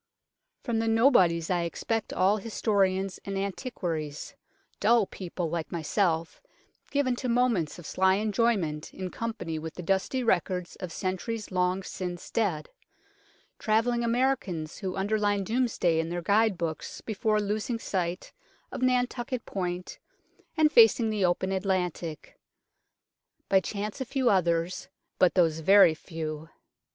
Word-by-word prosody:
From 230 -2 -1
the 225 - 0
nobodies 195 - +4
I 175 -1 +2
except 220 +6 -2
all 195 +3 +3
historians 195 -3 0
and 195 0 -4
antiquaries, 175 - -4 0.5
dull 235 -3 +4
people 180 -2 -5
like 170 -2 -3
myself, 165 0 -1 0.5
given 275 -3 +1
to 255 - -3
moments 235 -11 +1
of 175 - -11
sly 190 +3 +2
enjoyment 205 -7 0
in 185 -1 -5
company 220 -9 -4
with 160 0 -7
the 180 - -7
dusty 195 +8 0
records 180 -4 0
of 180 - -6
centuries 200 +5 -3
long 185 +1 0
since 180 -2 -6
dead; 195 -9 -1 0.9
travelling 235 +2 +1
Americans 230 - -1
who 190 -3 -4
underline 205 0 +1
Domesday 220 -7 +1
in 165 0 -1
their 175 0 -3
guide 205 +1 +3
books 160 -3 -4
before 215 0 0
losing 210 +3 -2
sight 180 -5 -3 0.4
of - - -6
Nan 250 -1 +3
tukket 245 0 -5
Point 180 -2 -4 0.6
and 310 -1 +4
facing 225 -3 +6
the 210 -2 0
open 180 +2 0
Atlantic; 180 -5 -2 1.1
by 190 - +5
chance 210 +5 -5
a - - -1
few 260 0 +1
others, 170 -2 0 0.3
but 180 - +4
those 165 -3 +3
very 195 0 +6
few. 155 -1 -6
195 Hz, 135 wpm, -28 LUFS, 175-225 Hz, 1.1 s, facing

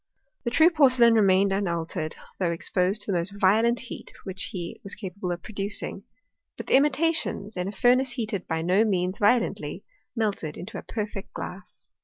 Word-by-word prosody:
The - - +1
true 320 +8 +5
porcelain 255 -7 +5
remained 195 -2 +4
unaltered, 170 -5 -2 0.2
though 180 -3 +1
exposed 180 +4 0
to 205 - -2
the 180 - +2
most 200 +4 -5
violent 225 +5 +3
heat 250 - -9
which 190 -1 -3
he 175 -3 -6
was 200 - -6
capable 190 -3 -5
of 175 -1 -5
producing; 200 -1 -4 0.5
but - - -6
the - - -1
imitations, 290 -6 +1
in 180 0 -2
a - - -3
fur 245 +5 +4
nace 260 0 0
heated 220 -6 -3
by 160 -1 -1
no 185 +5 +4
means 185 -3 0
violently, 230 +4 +1 0.3
melted 205 -9 -2
into 195 +6 -7
a - - -8
perfect 210 -3 -6
glass. 180 0 -9
200 Hz, 175 wpm, -26 LUFS, 180-235 Hz, 0.5 s, true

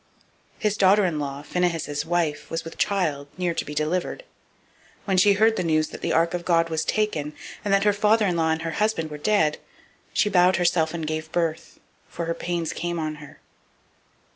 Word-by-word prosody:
004:019 - - -26
His 210 -1 +1
daughter 200 +1 +5
in 165 -4 -1
law, 140 0 -4
Phinehas' 160 -3 -1
wife, 160 -3 -1
was 165 0 -3
with 165 - -9
child, 160 -9 0
near 180 -2 0
to - - -2
be 150 - -8
delivered: 175 - -1
and - - -33
when 190 -2 +1
she 200 +2 +6
heard 220 +2 +3
the - - 0
news 155 -2 +1
that - - -9
the - - -1
ark 165 +1 +2
of 175 -1 -3
God 165 -1 +2
was 160 -1 -1
taken, 155 -9 -1 0.3
and 205 - -1
that 195 0 +4
her 205 -1 +4
father 210 +2 +3
in 180 -3 +1
law 165 -1 +1
and 160 0 -1
her 165 - -2
husband 165 -8 0
were 150 - -7
dead, 160 -4 +2 0.5
she - - +2
bowed 180 -2 +4
herself 170 -2 +1
and 165 -2 -3
brought 155 0 -3
forth; 165 -1 -3 0.3
for 170 - -5
her 165 - -1
pains 170 -1 -3
came 175 0 -3
on 155 -1 -3
her. 150 - -13
170 Hz, 210 wpm, -24 LUFS, 155-190 Hz, 0.5 s, she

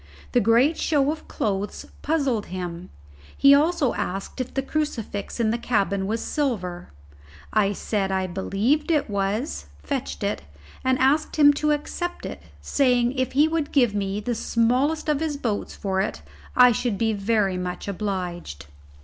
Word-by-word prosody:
The 245 - +4
great 240 +8 +4
show 290 -2 +2
of 310 - -7
clothes 200 -1 -2 0.2
puzzled 275 -8 0
him. 180 -1 -6 0.5
He 275 0 +7
also 295 -3 +3
asked 195 +7 -4
if 255 - -5
the 270 - -2
crucifix 255 -9 -3
in 220 -2 +2
the 235 - -1
cabin 200 -5 0
was 225 +2 -1
silver. 190 - -2 0.6
I 205 -2 +3
said 200 -1 -1
I 190 0 0
believed 200 - 0
it 300 -9 +1
was, 200 +8 -2 0.2
fetched 270 -5 -3
it, 200 - -1 0.4
and 260 0 +2
asked 280 +4 +2
him 290 -1 +7
to 300 +1 0
accept 350 +4 -3
it, - - -6 0.2
saying 245 -3 +2
if 260 -1 -2
he 290 +4 +5
would 320 -2 -1
give 245 -7 +3
me 200 0 -1
the 240 +3 -2
smallest 250 +8 +1
of 300 -2 +2
his 310 -2 -2
boats 225 -7 -3
for 190 -1 -1
it 75 - -3 0.3
I 250 0 +8
should 230 -2 -1
be 225 0 +1
very 200 -2 +1
much 180 +1 -5
obliged. 180 - -4
230 Hz, 160 wpm, -24 LUFS, 195-280 Hz, 0.6 s, I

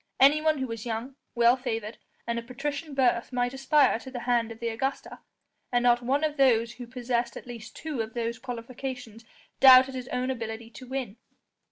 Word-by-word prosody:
Anyone 305 +3 +5
who 265 - -2
was 230 -3 -6
young, 235 +3 -4 0.2
well 235 +1 +5
favoured, 230 -4 -4 0.3
and 235 0 -1
of 230 - -11
patrician 290 +4 -4
birth 250 -3 +2
might 245 0 0
aspire 270 -2 +3
to 235 - -10
the 250 -2 -6
hand 235 -2 +1
of 225 - -10
the 235 -1 -2
Augusta, 265 +5 -4 0.5
and 245 -1 +2
not 240 0 +4
one 270 +5 0
of 305 -1 -1
those 235 -4 +3
who 245 -1 -9
possessed 240 -1 -2
at - - -10
least 235 -2 -9
two 300 -6 -4
of 220 +1 -6
those 235 0 -2
qualifications 245 -2 -7 0.3
doubted 260 0 +8
his 255 -1 -6
own 255 +1 -1
ability 225 -2 -6
to 255 +2 -11
win. 255 -5 -4
245 Hz, 190 wpm, -27 LUFS, 235-265 Hz, 0.5 s, doubted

